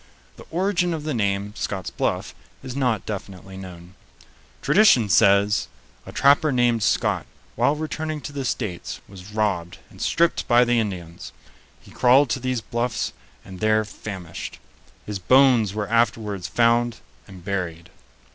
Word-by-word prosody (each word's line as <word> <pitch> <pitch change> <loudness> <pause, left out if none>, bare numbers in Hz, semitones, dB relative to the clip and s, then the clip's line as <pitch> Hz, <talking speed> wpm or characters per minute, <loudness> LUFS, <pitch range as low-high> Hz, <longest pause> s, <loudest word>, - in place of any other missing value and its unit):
The - - -14
origin 180 -1 0
of 155 - -6
the 155 -1 -2
name, 100 -2 -1
Scott's 95 -3 -4
Bluff, - - -2 0.3
is 130 -1 -7
not 125 -7 0
definitely 95 -2 -7
known. 90 -2 -10 0.7
Tradition 130 - +5
says: 100 +2 +4 0.4
"A - - -7
trapper 145 +2 +4
named 120 -3 +2
Scott, - - +1 0.3
while 145 - +2
returning 155 0 -4
to 145 - -7
the 140 -1 -3
States, 105 -8 -4
was 95 +1 -12
robbed 100 -5 -1
and - - -13
stripped 170 +1 +1
by 120 +1 +5
the 120 -1 +2
Indians. 90 -6 -5 0.5
He - - -18
crawled 130 +1 +4
to 130 - 0
these 130 -2 -2
Bluffs 120 +1 -2 0.3
and 95 -1 -10
there 110 0 +2
famished. 95 -5 -8 0.5
His 105 -2 -4
bones 120 -1 +4
were 105 -1 -2
afterwards 105 -4 0
found 120 +1 +2 0.3
and 95 -3 -13
buried." 90 -4 -4
110 Hz, 145 wpm, -23 LUFS, 95-130 Hz, 0.7 s, Tradition